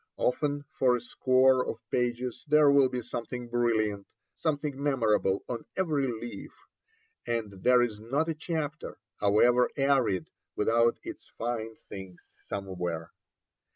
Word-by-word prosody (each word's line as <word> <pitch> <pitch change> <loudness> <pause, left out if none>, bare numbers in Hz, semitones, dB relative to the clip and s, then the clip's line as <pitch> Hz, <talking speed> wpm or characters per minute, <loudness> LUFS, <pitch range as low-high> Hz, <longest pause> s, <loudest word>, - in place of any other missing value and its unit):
Often 145 +2 0
for 125 -2 +3
a - - -1
score 130 +2 +3
of 115 - -4
pages 125 +1 -1
there 150 -1 +6
will 140 -2 +5
be 125 -1 -3
something 120 +1 -5
brilliant, 110 -4 0 0.3
something 145 -3 -2
memorable 110 -8 +1
on 120 -2 -5
every 150 -7 +1
leaf, 120 0 -6 0.7
and 115 -3 -1
there 125 +2 +5
is 110 -4 -3
not 135 +9 -1
a 165 - 0
chapter, 155 -1 -4 0.2
however 120 +5 +4
arid, 130 - +2 0.2
without 115 +2 +3
its - - -9
fine 115 -1 -3
things 95 -2 -10 0.2
somewhere. 90 -4 -4
120 Hz, 125 wpm, -29 LUFS, 110-140 Hz, 0.7 s, there